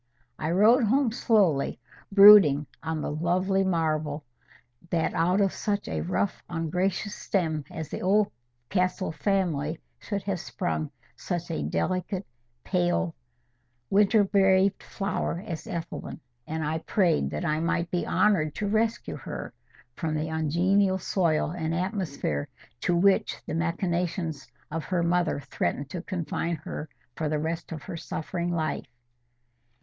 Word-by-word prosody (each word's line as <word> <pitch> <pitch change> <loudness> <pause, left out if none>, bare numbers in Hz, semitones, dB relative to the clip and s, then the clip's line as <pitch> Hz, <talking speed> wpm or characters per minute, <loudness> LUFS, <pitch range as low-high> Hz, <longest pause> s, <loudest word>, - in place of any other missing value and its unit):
I 155 - -1
rode 220 +8 +5
home 255 +2 +3
slowly, 200 - +2 0.3
brooding 195 -8 +9 0.2
on 160 -1 -3
the - - -2
lovely 185 +5 +1
marvel, 155 -4 0 0.6
that 165 -2 0
out 180 +4 +2
of 195 -2 +2
such 205 -1 -2
a - - -2
rough 185 +2 -1
ungracious 180 +5 -1
stem 160 -9 -1
as 160 -2 -6
the - - -5
Oldcastle 180 - 0
family, 165 -5 0 0.2
should 200 -2 -4
have 195 -2 -2
sprung 160 -3 -3 0.3
such 175 -2 -4
a 75 - -2
delicate, 185 - -1 0.4
pale, 175 -2 +1 0.8
winter 205 +2 +5
braved 195 0 +3
flower, 195 -3 -3
as 165 -7 -6
Ethelwyn. 170 0 -5 0.3
And 160 0 -2
I 155 +2 -1
prayed 170 -2 +1
that 175 - -3
I 155 -1 +1
might 170 +1 -1
be 175 - -1
honoured 170 -8 +2
to 205 - -2
rescue 220 +2 0
her - - -7 0.4
from 155 +1 -2
the 155 +1 -2
ungenial 180 +5 +2
soil 170 -4 +1
and 165 -2 -2
atmosphere 175 - -2 0.3
to 175 - +1
which 195 +3 +3
the - - -5
machinations 170 -1 -1 0.2
of 160 0 -3
her 180 -2 0
mother 175 -2 +1
threatened 140 +2 -3
to 175 - -4
confine 170 -2 -2
her 160 -1 -7 0.3
for 155 -2 -2
the 155 - 0
rest 160 +3 -3
of 155 -2 -7
a - - -5
suffering 170 +3 -3
life. 160 -4 -2
175 Hz, 135 wpm, -27 LUFS, 160-195 Hz, 0.8 s, brooding